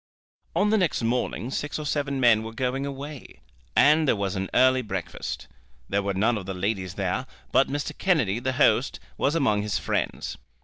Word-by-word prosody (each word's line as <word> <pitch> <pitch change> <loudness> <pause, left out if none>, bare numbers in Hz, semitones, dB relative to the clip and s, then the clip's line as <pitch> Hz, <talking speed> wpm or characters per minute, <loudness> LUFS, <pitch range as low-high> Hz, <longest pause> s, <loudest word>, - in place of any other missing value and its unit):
On 210 +1 +3
the 220 - +4
next 170 -9 0
morning 120 +1 -1
six 145 +1 -3
or 155 - -5
seven 140 -2 -1
men 120 -4 +5
were 115 0 -7
going 130 +2 -1
away, 140 +1 -8 0.4
and 155 +1 +5
there - - +4
was 100 -1 -2
an 95 0 -2
early 130 0 +4
breakfast. 95 -7 -5 0.4
There 100 +1 +1
were 100 -1 -2
none 110 +3 +2
of 95 - -10
the 95 - -3
ladies 95 -1 -2
there, 100 +7 -2 0.2
but 135 - +4
Mr. 145 +1 -3
Kennedy, 125 - +1
the 130 +1 -1
host, - - +3 0.2
was 145 - +1
among 110 -10 +2
his 105 -1 -1
friends. - - -2
125 Hz, 185 wpm, -26 LUFS, 100-140 Hz, 0.4 s, men